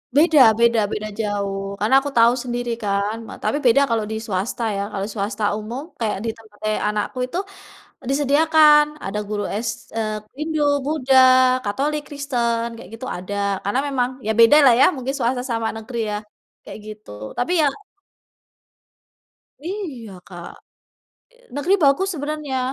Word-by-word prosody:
Beda 310 0 +5 0.2
beda 235 -1 +4
beda 215 0 -3
jauh, 200 -2 -3
karena 220 +6 +2
aku 285 +1 -5
tahu 230 +1 +6
sendiri 245 -1 -3
kan 200 +2 0
ma - - -9
tapi 215 +7 0
beda 245 +4 +5
kalau 220 -2 0
di - - -2
swasta 210 +3 -3
ya, - - -1
kalau 200 0 -3
swasta 210 +1 -3
umum 230 +5 -6 0.2
kayak 220 -4 -1
di 225 - 0
tempat 215 -2 -19
eee 215 0 0
anakku 210 +4 -2
itu, 340 - -5 0.7
disediakan 300 +2 +5 0.2
ada 205 +2 -3
guru 205 -1 -2 0.2
s - - 0 0.3
eee, 215 -1 -1 0.2
Hindu, 310 0 -2 0.2
Buddha, 270 -3 +2 0.5
Katolik, 290 +9 -1
Kristen, 240 -5 -1
kayak - - -12
gitu 255 +3 -8
ada, 185 +3 -6 0.3
karena 205 +6 0
memang 255 -3 0 0.2
ya - - +2
beda 230 +6 +7
lah 245 - +7
ya, - - +7
mungkin 260 +1 -3
swasta 245 0 -1
sama 225 -1 -1
negeri 235 +2 -7
ya, 210 - -2 0.5
kayak - - -10
gitu, 215 0 -11 0.3
tapi 245 +8 -1
ya. 295 - +4 2.0
Iya 310 - -6 0.2
Kak. 175 -2 -9 1.1
Negeri 315 +7 +1
bagus 280 +8 +3
sebenarnya. 290 -2 -3
235 Hz, 150 wpm, -21 LUFS, 215-280 Hz, 2.0 s, beda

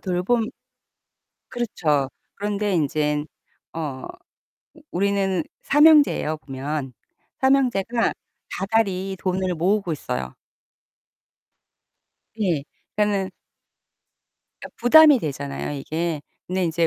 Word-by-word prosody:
돌봄 190 +5 0 1.0
그렇죠. 155 - 0 0.3
그런데 205 0 -1
인제는 150 -2 0 0.5
어 150 -5 -4 0.9
우리는 195 -1 +1 0.2
3 295 +2 +5
형제에요 290 - +5
보면. 135 0 -5 0.5
3 265 0 +5
형제가 235 -3 0 0.4
다달이 195 -2 0
돈을 185 -1 -1
모으고 180 +2 +1
있어요. 65 - -4 2.0
예. 170 -9 +1 0.3
그러니까는 205 -2 +1 1.3
그러니까 - - -10
부담이 295 +4 +7
되잖아요 140 - -4
이게. 160 +2 -2 0.3
근데 185 0 -1
이제 165 0 +1
185 Hz, 205 characters per minute, -23 LUFS, 150-210 Hz, 2.0 s, 부담이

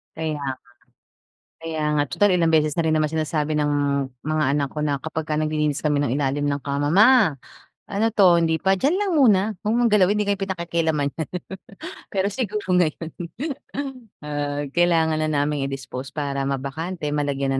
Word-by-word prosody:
Kaya 160 -1 -2
nga. 140 -2 -3 1.1
Kaya 160 -1 -3
nga 145 -1 +2
tutal 205 -2 +3
ilang 170 -2 +3
beses 155 -2 +3
na 170 - 0
rin 160 - 0
naman 155 - +2
sinasabi 155 0 -1
ng 150 -1 +1 0.5
mga 155 0 +1
anak 140 -1 0
ko 150 - -3
na 145 -2 0
kapag 160 +2 -5
ka 150 - 0
naglilinis 155 -1 -1
kami 145 -1 +2
ng 145 - 0
ilalim 145 +1 0
ng 140 - 0
kama. 145 +1 -1
"Ma, 210 - +5 0.5
ano 205 +2 0
'to 185 -5 +6
hindi 160 -1 +1
pa?" 190 0 +2
"Diyan 300 - +1
lang 400 -3 0
muna 225 -10 +5 0.2
'wag 215 - +1
mong 240 0 +3
galawin 210 -1 +3
hindi 205 - -1
kayo 200 - +2
pinakikialaman 170 -6 -1
niyan." 160 - -3 0.9
Pero 195 0 +1
siguro 210 -2 -3
ngayon, 170 -2 +1 1.2
ah, 145 0 -2
kailangan 165 -2 +2
na 155 - 0
naming 145 -2 0
i-dispose 135 0 -6
para 140 -2 -3
mabakante 150 +6 -4
malagyan 140 -2 -1
155 Hz, 170 wpm, -23 LUFS, 145-185 Hz, 1.2 s, to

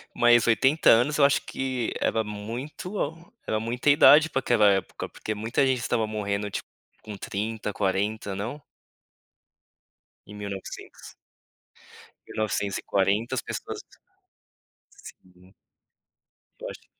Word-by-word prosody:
Mas 120 -1 +5
80 130 +7 +4
anos 125 +7 +3
eu 140 - +6
acho 140 - +3
que 130 -3 -3
era 110 - +1
muito 120 - -5 0.3
era 110 - 0
muita 120 +5 -1
idade 150 +2 +7
pra 135 - 0
aquela 115 -5 +4
época, 95 -2 -2
porque 110 - -5
muita 115 +5 0
gente 130 -1 +1
estava 115 -2 0
morrendo 105 -1 -2
tipo - - -5 0.4
com 105 -2 -8
30, 105 +2 -4
40, 100 +1 -1
não? 120 +9 -5 1.6
Em 105 - -12
1900. 100 -2 -8 1.1
1940 100 +2 -1
as - - -1
pessoas - - -6 1.1
Sim. 90 +1 -16 1.1
Eu - - -6
acho - - -11
110 Hz, 115 wpm, -26 LUFS, 100-125 Hz, 1.6 s, idade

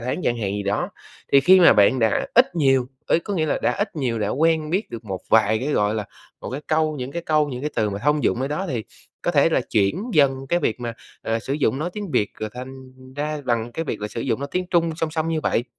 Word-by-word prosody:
tháng 125 +8 -3
chẳng 120 - +1
hạn 100 -3 -2
gì 100 0 -3
đó, 100 +1 -1 0.4
thì 140 - +7
khi 185 +5 +6
mà 170 - +8
bạn 105 +6 +4
đã 110 -2 +1
ít 245 -5 +5
nhiều, 135 -6 +3 0.2
ý - - +4
có 200 +4 -5
nghĩa 160 -4 0
là - - 0
đã - - +2
ít 200 -3 -3
nhiều 125 -6 -1
đã 105 -2 -1
quen 155 +4 +1
biết 190 +6 -1
được 115 0 -7
một 95 -3 -5
vài 110 0 +4
cái, 130 - -3
gọi 105 +1 +1
là, 110 -1 -2 0.4
một - - -6
cái 135 +3 -4
câu 155 -1 +1
những 130 0 -5
cái 170 - -4
câu, 155 -2 +2
những 125 -2 -5
cái 150 - -2
từ 105 -2 +1
mà 100 - -4
thông 150 +4 +1
dụng 120 - +1
ở 135 - -1
đó 170 +7 -2
thì 120 -7 -3 0.4
có - - +1
thể - - +4
là - - +2
chuyển 105 - +1
dần 135 -3 +3
cái 175 - +2
việc 125 -7 -1
mà, 120 -1 -3 0.3
à, 115 0 -1
sử 130 - -5
dụng 140 -2 +1
nói 165 +4 -2
tiếng 205 -3 -6
Việt 105 - +1
rồi 110 0 -3
thành 130 +2 -7 0.4
ra 150 +1 -3
bằng 120 -1 -1
cái 165 - -3
việc - - -4
là 105 - -3
sử 115 - -5
dụng 120 0 -1
nói 140 - -4
tiếng 180 0 -1
Trung 170 -2 +2
song 160 -1 -2
song 160 0 -2
như 160 -1 0
vậy, 120 - 0
135 Hz, 275 wpm, -22 LUFS, 115-160 Hz, 0.4 s, mà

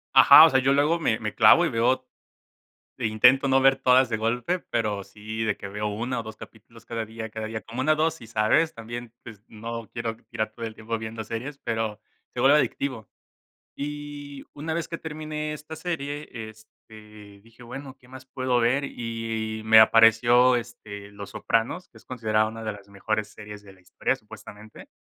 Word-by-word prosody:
Ajá, - - +10
o - - +5
sea, 130 - +3
yo 135 +1 +2
luego 150 +4 +2
me 110 -8 0
me 105 -1 -4
clavo, 115 +11 +6
y - - 0
veo 125 +2 +1 0.9
e - - -1
intento 125 +6 +4
no 135 0 +3
ver 135 0 +5
todas 130 -1 +4
de 110 - -1
golpe, 120 +11 -1
pero 105 -7 -2
sí 110 +3 -6
de 105 - 0
que 100 - -8
veo 105 +1 -3
1, 120 +4 -3
o, - - -5
2 110 0 -9
capítulos 115 +2 -15
cada 115 -1 -4
día, 110 0 -7
cada 110 0 -5
día, 110 0 -5
como 115 +3 -8
una 155 +3 +3
dosis, 155 -7 -2
¿sabes? 120 +9 +2
También, 120 +1 -8
pues, 110 -4 -12
no 115 0 -7
quiero 115 -1 -4
tirar 110 -2 -3
todo 115 +1 -7
el 110 - -7
tiempo 115 +1 -4
viendo 110 0 -6
series, 125 +7 -6
pero 110 -2 -3 0.3
se - - -3
vuelve 140 +3 +6
adictivo. 130 -7 -2 0.7
Y 145 -1 -7
una 160 +2 -4
vez 165 0 -3
que 165 -1 -5
terminé 155 -1 -5
esta 150 +1 -8
serie, 150 -3 -5
este, 110 -2 -13
dije: 115 +1 -17
"Bueno, 130 +2 -9
¿qué 125 - -21
más 130 0 -12
puedo 130 -2 -1
ver?" 135 +4 +2
Y 115 -2 -4
y - - -10
me 110 0 +7
apareció, 120 +3 +5
este, 105 -4 -7
Los 100 -1 -9
Sopranos, 115 +11 -1
que 110 - -18
es - - -19
considerada 110 -3 0
una 115 0 -8
de 110 - -2
las 100 -1 -13
mejores 105 +1 -3
series 105 -1 -11
de 100 -2 -15
la 95 - -23
historia, 90 - -1
supuestamente. 105 0 -13
115 Hz, 195 wpm, -25 LUFS, 110-135 Hz, 0.9 s, Ajá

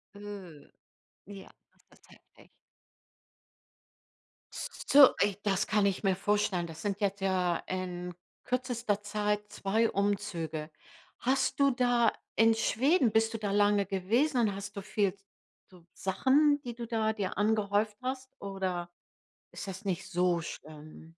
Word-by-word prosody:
Mhm. 195 -7 -10 0.6
Ja. 200 -1 -11 0.2
Das - - -26
ist - - -25
heftig. - - -21 2.0
S - - -5
s - - -11
so, 280 -2 +8
ey, 200 -1 0
das 195 -3 +1
kann 210 -2 +2
ich 195 +2 -2
mir 190 -1 +2
vorstellen. 195 -3 0
Das 160 0 -10
sind 205 0 -2
jetzt 200 0 -1
ja 180 -3 +1
in 180 -1 -4 0.3
kürzester 245 -4 -1
Zeit 210 0 -1
2 220 +3 +1
Umzüge. 190 -6 -2 0.5
Hast 265 +3 0
du 280 -1 +5
da 245 -1 +3 0.2
in 225 0 +5
Schweden 255 - +2
bist 225 +1 +2
du - - -2
da 205 -2 -2
lange 205 0 +3
gewesen 235 +9 +1
und 205 -3 +1
hast 200 +1 -7
du - - -3
viel 205 -2 +1
s 195 0 -28 0.4
so 180 -3 -18
Sachen, 285 +9 +2
die 240 -2 -6
du 235 -1 -6
da 220 -1 0
dir 200 -4 -4
angehäuft 210 0 +1
hast 260 0 -4
oder 185 -3 -4 0.6
ist - - -7
das 190 +3 -7
nicht 185 -3 -2
so 175 -1 +2
schlimm? 155 0 -10
205 Hz, 145 wpm, -30 LUFS, 190-225 Hz, 2.0 s, so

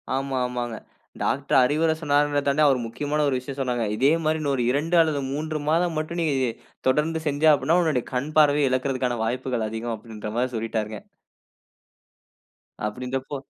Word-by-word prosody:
ஆமா, 135 0 -2
ஆமாங்க. 120 -2 -4 0.4
டாக்டர் 140 0 +1
அறிவுரை 155 +5 +2
சொன்னாருங்கிறத 145 -1 +1
தாண்டி, 140 +2 +2
அவர் 135 -3 +3
முக்கியமான 145 +6 -2
ஒரு 135 - +1
விஷயம் 135 +2 -8
சொன்னாங்க. 125 -3 -1
இதே 135 +6 +3
மாதிரி 155 +1 +1
இன்னும் 145 -2 0
ஒரு 125 - 0
2 155 +6 0
அல்லது 155 -3 +1
3 155 +2 -3
மாதம் 170 +1 +2
மட்டும் 170 +2 -4
நீ - - +1 0.6
தொடர்ந்து 155 +4 +1
செஞ்சா 150 +2 +4
அப்படினா 150 +5 +2
உன்னுடைய 150 -7 0
கண் 135 +5 -2
பார்வைய 145 -2 +5
இழக்குறதற்கான 130 -2 -1
வாய்ப்புகள் 125 -1 -2
அதிகம். 115 +1 -3
அப்படிங்கிற 105 -1 -8
மாதிரி 125 +1 0
சொல்லிட்டாருங்க. 110 -1 -3 1.9
அப்படின்றப்போ 130 +5 -4
135 Hz, 150 wpm, -24 LUFS, 125-150 Hz, 1.9 s, பார்வைய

